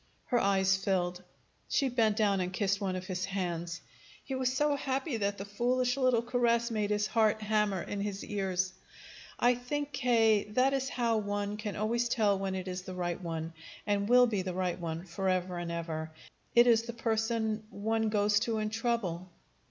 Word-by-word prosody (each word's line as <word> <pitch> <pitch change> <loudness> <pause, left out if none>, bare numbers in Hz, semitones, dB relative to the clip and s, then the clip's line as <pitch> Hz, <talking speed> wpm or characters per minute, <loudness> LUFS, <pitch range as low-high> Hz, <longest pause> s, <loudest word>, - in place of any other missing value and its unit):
Her 245 - +2
eyes 195 -1 +3
filled. 180 -2 -1 0.5
She 275 - +2
bent 225 -4 +2
down 200 -3 +2
and 180 0 -2
kissed 200 +1 0
one 190 -2 -1
of 185 0 -5
his 185 -1 -2
hands. 175 -3 -3 0.4
He 270 - -5
was 260 -1 +1
so 290 +2 +2
happy 270 -1 -2
that 200 -1 -1
the 195 - -6
foolish 250 +4 +1
little 255 -4 +2
caress 235 -1 +1
made 210 -2 0
his 210 0 +1
heart 220 -1 +2
hammer 210 -3 +1
in 205 - -4
his 200 -1 -3
ears. 190 -2 -1 0.7
"I 245 +1 +5
think, 285 +4 -3
K., 225 -5 +3
that 265 +2 +4
is 265 0 0
how 235 -2 +1
one 205 0 -2
can 210 -1 -5
always 235 +3 0
tell 205 -4 +2
when 195 -1 -2
it 185 0 -4
is 185 0 -4
the 185 0 -8
right 175 -1 -2
one, 165 -1 -4 0.3
and 205 0 0
will 250 0 +7
be 210 -5 0
the 185 -1 -4
right 185 -1 -1
one 165 0 -4
forever 185 0 -1
and 170 -1 -4
ever. 160 -2 -4 0.5
It 240 0 +8
is 230 -2 +5
the 235 +1 -7
person 225 -1 -1
one 220 +2 -1
goes 205 -1 +3
to 225 +1 -1
in 215 0 -2
trouble." 220 -6 -2
210 Hz, 190 wpm, -31 LUFS, 185-235 Hz, 0.7 s, It